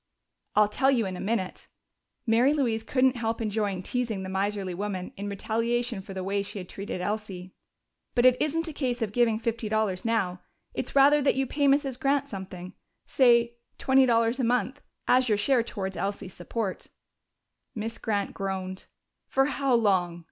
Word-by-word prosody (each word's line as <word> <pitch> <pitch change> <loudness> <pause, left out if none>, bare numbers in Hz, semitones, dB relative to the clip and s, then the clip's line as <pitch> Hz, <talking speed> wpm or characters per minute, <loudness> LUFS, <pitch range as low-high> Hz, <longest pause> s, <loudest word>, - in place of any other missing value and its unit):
"I'll 210 0 +5
tell 265 +6 +1
you 245 -5 +2
in 185 -1 -4
a - - -7
minute." 195 -3 -3 0.6
Mary 240 +5 +4
Louise 235 -6 0
couldn't 255 +2 +2
help 225 -1 -2
enjoying 205 -4 -1
teasing 230 -4 -2
the 190 - -5
miserly 195 -1 -1
woman 190 -1 -4
in 200 +1 -5
retaliation 230 +2 -1
for 195 0 -10
the 190 - -3
way 200 +1 0
she 200 +1 -8
had 180 -2 -6
treated 195 -1 -6
Elsie. 190 -3 -4 0.6
"But 240 0 +3
it 255 -1 +7
isn't 330 +2 0
a 320 - -5
case 250 -4 -1
of 210 - -3
giving 230 -1 +2
fifty 230 -1 -3
dollars 215 -4 0
now. 195 -6 0 0.3
It's - - -5
rather 285 +2 +6
that 280 - +2
you 270 0 +1
pay 285 +2 0
Mrs. 275 -2 +2
Grant 275 0 +1
something 185 -2 -8 0.3
say 235 -2 +3 0.2
twenty 265 0 +4
dollars 230 +1 +2
a - - +1
month 250 +4 0 0.3
as 255 0 +4
your 210 - +3
share 245 +4 +3
towards 195 -4 -5
Elsie's 195 -2 -4
support." 195 +2 -4 0.9
Miss 225 +1 -4
Grant 205 -3 -1
groaned. 190 -1 -4 0.4
"For 270 0 +2
how 275 -2 +1
long?" 185 -6 +2
225 Hz, 175 wpm, -27 LUFS, 195-250 Hz, 0.9 s, it